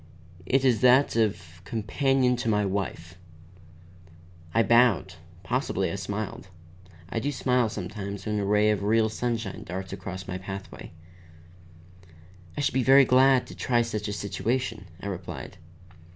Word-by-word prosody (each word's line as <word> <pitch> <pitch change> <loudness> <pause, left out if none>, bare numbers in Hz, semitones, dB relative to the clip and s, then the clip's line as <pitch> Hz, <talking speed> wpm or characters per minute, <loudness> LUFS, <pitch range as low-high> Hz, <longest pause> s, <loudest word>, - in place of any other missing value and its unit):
It 135 +4 +2
is 125 -4 +3
that 130 +1 +5
of 90 -7 -1
companion 125 +5 +1
to 115 -1 -2
my 105 -1 +2
wife." 90 -3 -4 1.3
I 115 - +3
bowed; 115 -5 +3 0.3
possibly 100 -7 -1
I - - -3
smiled. 100 +1 -5 0.6
I 115 - -2
do 145 +5 -2
smile 125 -4 +1
sometimes 100 -1 -6
when 105 -1 -1
a - - -1
ray 105 +1 +3
of 105 - -1
real 110 +2 +2
sunshine 115 -2 -3
darts 95 +2 -6
across 95 -1 -7
my 90 0 -4
pathway. 95 +1 -8 1.7
"I - - 0
should 140 - 0
be 130 - +2
very 135 +2 +7
glad 130 0 +4
to - - -11
try 120 -2 +1
such 110 -2 -4
a 105 - -3
situation," 110 +1 -2
I - - -10
replied. 95 -3 -6
105 Hz, 145 wpm, -26 LUFS, 95-125 Hz, 1.7 s, very